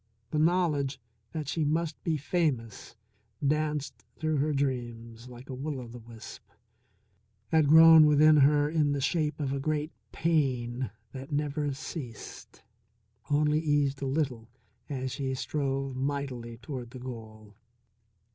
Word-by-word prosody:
The 150 Hz, -, 0 dB
knowledge 155 Hz, -5 st, +1 dB, 0.3 s
that 155 Hz, -3 st, -4 dB
she 160 Hz, +2 st, -1 dB
must 155 Hz, +1 st, -1 dB
be 160 Hz, -2 st, 0 dB
famous 135 Hz, -, -2 dB, 0.5 s
danced 150 Hz, 0 st, -1 dB
through 155 Hz, -1 st, 0 dB
her 150 Hz, +3 st, +1 dB
dreams 120 Hz, -4 st, -3 dB
like 125 Hz, +2 st, -12 dB
a 130 Hz, -, -6 dB
will 140 Hz, +2 st, -4 dB
o' 125 Hz, -, -8 dB
the 120 Hz, +1 st, -10 dB
wisp; 115 Hz, 0 st, -11 dB, 1.1 s
had 160 Hz, -2 st, +4 dB
grown 160 Hz, 0 st, +9 dB
within 150 Hz, +1 st, +6 dB
her 145 Hz, +1 st, +5 dB
in 150 Hz, -2 st, +1 dB
the 140 Hz, -, -1 dB
shape 150 Hz, +2 st, 0 dB
of 140 Hz, -2 st, -1 dB
a 140 Hz, -, -1 dB
great 150 Hz, +2 st, -1 dB, 0.2 s
pain 130 Hz, -, 0 dB, 0.2 s
that 135 Hz, +1 st, -9 dB
never 145 Hz, 0 st, -1 dB
ceased; 135 Hz, -6 st, -8 dB, 0.7 s
only 150 Hz, +1 st, +3 dB
eased 145 Hz, -3 st, +1 dB
a 135 Hz, -, -1 dB
little 130 Hz, -5 st, -2 dB, 0.4 s
as 130 Hz, -2 st, -3 dB
she 130 Hz, 0 st, -2 dB
strove 135 Hz, -1 st, -2 dB
mightily 130 Hz, -4 st, -3 dB
toward 125 Hz, 0 st, -7 dB
the 130 Hz, -, -10 dB
goal. 110 Hz, -4 st, -9 dB
140 Hz, 135 wpm, -29 LUFS, 125-150 Hz, 1.1 s, grown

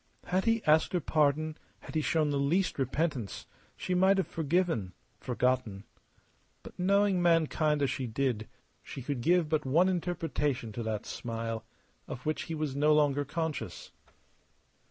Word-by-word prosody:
Had 185 Hz, +1 st, 0 dB
he 230 Hz, -1 st, +2 dB
asked 155 Hz, +3 st, +4 dB
her 180 Hz, -, +2 dB
pardon, 155 Hz, 0 st, +1 dB, 0.2 s
had -, -, -10 dB
he 155 Hz, -, +1 dB
shown 155 Hz, -1 st, +1 dB
the 140 Hz, -, 0 dB
least 165 Hz, +5 st, +1 dB
repentance, 135 Hz, -, -2 dB, 0.3 s
she 185 Hz, -, -2 dB
might 190 Hz, +2 st, +4 dB
have 190 Hz, -, +1 dB
forgiven, 160 Hz, -, 0 dB, 0.3 s
forgotten. 125 Hz, -5 st, -1 dB, 0.8 s
But -, -, -12 dB
knowing 200 Hz, 0 st, +3 dB
mankind 155 Hz, -3 st, +2 dB
as 135 Hz, -, +1 dB
she 130 Hz, -2 st, -3 dB
did 115 Hz, -2 st, -1 dB, 0.3 s
she 135 Hz, -, -8 dB
could 135 Hz, -2 st, -3 dB
give 175 Hz, +4 st, +3 dB
but 155 Hz, -1 st, 0 dB
one 160 Hz, +8 st, +3 dB
interpretation 160 Hz, -9 st, -1 dB
to 115 Hz, -, -5 dB
that 110 Hz, -2 st, -3 dB
smile 115 Hz, -1 st, -4 dB, 0.4 s
of 125 Hz, -, -7 dB
which 155 Hz, 0 st, -1 dB
he 165 Hz, -, -2 dB
was 150 Hz, -3 st, -2 dB
no 150 Hz, +2 st, +4 dB
longer 145 Hz, -1 st, +3 dB
conscious. 145 Hz, -, -4 dB
150 Hz, 155 wpm, -30 LUFS, 130-170 Hz, 0.8 s, asked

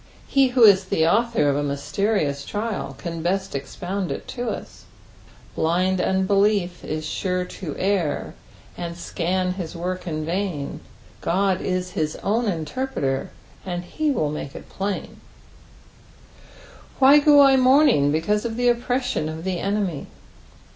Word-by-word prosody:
He 275 Hz, -1 st, +4 dB
who 250 Hz, -1 st, +3 dB
is 195 Hz, -3 st, +7 dB
the 160 Hz, -3 st, +1 dB
author 230 Hz, -3 st, +2 dB
of 140 Hz, -, +2 dB
a 145 Hz, -, 0 dB
mysterious 145 Hz, +1 st, -1 dB
thai 215 Hz, +5 st, -3 dB
can 170 Hz, -1 st, -5 dB
bett 190 Hz, +3 st, -1 dB
expound 180 Hz, +7 st, -4 dB
it -, -, -5 dB
to 245 Hz, -1 st, -3 dB
us. -, -, -7 dB, 0.4 s
" -, -, -25 dB
BItod 180 Hz, +3 st, +1 dB
unbelief 190 Hz, -1 st, +1 dB
Is 155 Hz, 0 st, -4 dB
sure 180 Hz, +3 st, -2 dB
to 175 Hz, -4 st, -7 dB
err, 185 Hz, -7 st, -1 dB, 0.4 s
And 170 Hz, -1 st, -5 dB
ecHU 180 Hz, +2 st, -2 dB
Ills 170 Hz, -1 st, -5 dB
wock 180 Hz, +1 st, -4 dB
In 155 Hz, -2 st, -3 dB
vain; 170 Hz, -4 st, -3 dB, 0.4 s
Qod 190 Hz, +1 st, +1 dB
<B -, -, -4 dB
hid 180 Hz, -4 st, -2 dB
own 225 Hz, +4 st, +1 dB
luterpreter, 165 Hz, -, -2 dB, 0.4 s
And 175 Hz, -1 st, -4 dB
be 310 Hz, -1 st, +1 dB
wlU 155 Hz, -, 0 dB
make 140 Hz, -2 st, -6 dB
It -, -, -9 dB
pUJu." 195 Hz, +1 st, -3 dB, 1.9 s
"Why 275 Hz, +2 st, +7 dB
go 290 Hz, 0 st, +6 dB
I 270 Hz, -1 st, +6 dB
nvruming 255 Hz, -, +5 dB
teeaatt 190 Hz, +7 st, 0 dB
of 230 Hz, -2 st, -3 dB
th» 245 Hz, -1 st, +3 dB
opprettum 245 Hz, -9 st, -1 dB
of 160 Hz, +1 st, -6 dB
the 185 Hz, -1 st, -2 dB
enemy?" 195 Hz, -6 st, -2 dB
185 Hz, 145 wpm, -23 LUFS, 160-215 Hz, 1.9 s, is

